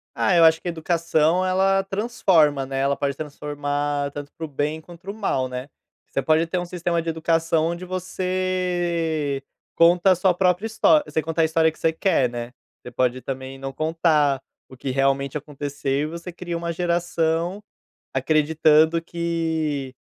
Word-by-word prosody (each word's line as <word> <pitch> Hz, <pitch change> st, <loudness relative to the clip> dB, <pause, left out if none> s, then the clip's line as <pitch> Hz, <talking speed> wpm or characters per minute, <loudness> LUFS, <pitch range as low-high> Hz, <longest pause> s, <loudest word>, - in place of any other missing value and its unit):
Ah, 190 Hz, -, +2 dB
eu 170 Hz, -, +6 dB
acho 160 Hz, 0 st, +6 dB
que -, -, -7 dB
a -, -, 0 dB
educação 165 Hz, +1 st, +1 dB
ela 195 Hz, +1 st, +2 dB
transforma, 190 Hz, -, +2 dB
né, 135 Hz, 0 st, -3 dB
ela 140 Hz, +1 st, +1 dB
pode 140 Hz, -1 st, -1 dB
transformar 145 Hz, -1 st, -3 dB
tanto 145 Hz, 0 st, -8 dB
para 165 Hz, -, -5 dB
o -, -, -7 dB
bem 150 Hz, +2 st, -2 dB
quanto 170 Hz, +1 st, -14 dB
para 195 Hz, -, -6 dB
o -, -, -9 dB
mal, 195 Hz, -12 st, -1 dB
né. 125 Hz, +2 st, -6 dB, 0.4 s
Você -, -, -2 dB
pode 160 Hz, +3 st, +2 dB
ter 180 Hz, -, -2 dB
um 180 Hz, -, -2 dB
sistema 170 Hz, -1 st, -1 dB
de 165 Hz, -, -4 dB
educação 165 Hz, 0 st, +1 dB
onde 170 Hz, +2 st, -4 dB
você 180 Hz, -5 st, -1 dB, 0.3 s
conta 175 Hz, +3 st, +5 dB
a 185 Hz, -, +5 dB
sua 180 Hz, +1 st, +2 dB
própria 180 Hz, +3 st, +1 dB
história 165 Hz, -8 st, +3 dB
você 155 Hz, +1 st, 0 dB
conta 165 Hz, +1 st, -1 dB
a -, -, +5 dB
história 160 Hz, 0 st, +2 dB
que -, -, -21 dB
você 160 Hz, -, +1 dB
quer, 160 Hz, -7 st, +2 dB
né. 120 Hz, 0 st, -6 dB, 0.3 s
Você 125 Hz, -, -10 dB
pode 125 Hz, +1 st, 0 dB
também 130 Hz, 0 st, -6 dB
não 135 Hz, 0 st, -5 dB
contar 155 Hz, -2 st, +1 dB, 0.3 s
o 130 Hz, -, -13 dB
que 130 Hz, -, -5 dB
realmente 135 Hz, +1 st, +1 dB
aconteceu 145 Hz, -1 st, -5 dB
e -, -, 0 dB
você 170 Hz, +3 st, -7 dB
cria 175 Hz, -1 st, -5 dB
uma 170 Hz, 0 st, -3 dB
geração 170 Hz, +1 st, 0 dB, 0.5 s
acreditando 155 Hz, +3 st, +3 dB
que 160 Hz, -5 st, -2 dB
160 Hz, 175 wpm, -23 LUFS, 145-175 Hz, 0.5 s, eu